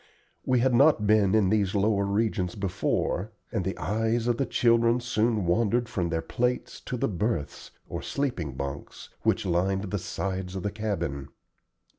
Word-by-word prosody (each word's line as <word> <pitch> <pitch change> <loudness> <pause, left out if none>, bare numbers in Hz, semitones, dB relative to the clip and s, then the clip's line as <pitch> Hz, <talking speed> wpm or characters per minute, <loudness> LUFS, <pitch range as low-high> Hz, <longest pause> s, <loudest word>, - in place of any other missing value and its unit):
We 125 -2 +3
had 130 0 +3
not 135 -3 +5
been 105 -1 +4
in 105 -4 +4
these 105 -2 +1
lower 100 0 +2
regions 100 -3 0
before, 95 +1 -1 0.2
and 110 -5 -1
the 95 +2 -3
eyes 115 +2 0
of 120 -1 +2
the 135 - 0
children 115 +1 +3
soon 115 -4 0
wandered 115 +6 +2
from 90 -5 -2
their 80 -1 -1
plates 125 +1 -2
to 125 - -2
the - - 0
berths, 100 -6 -2 0.2
or - - -5
sleeping 90 - -2
bunks, 70 +1 -6
which - - +1
lined 95 +2 0
the 105 - -1
sides 95 +1 -4
of 95 - -4
the 105 - -1
cabin. 85 -11 -3
105 Hz, 165 wpm, -27 LUFS, 95-115 Hz, 0.2 s, not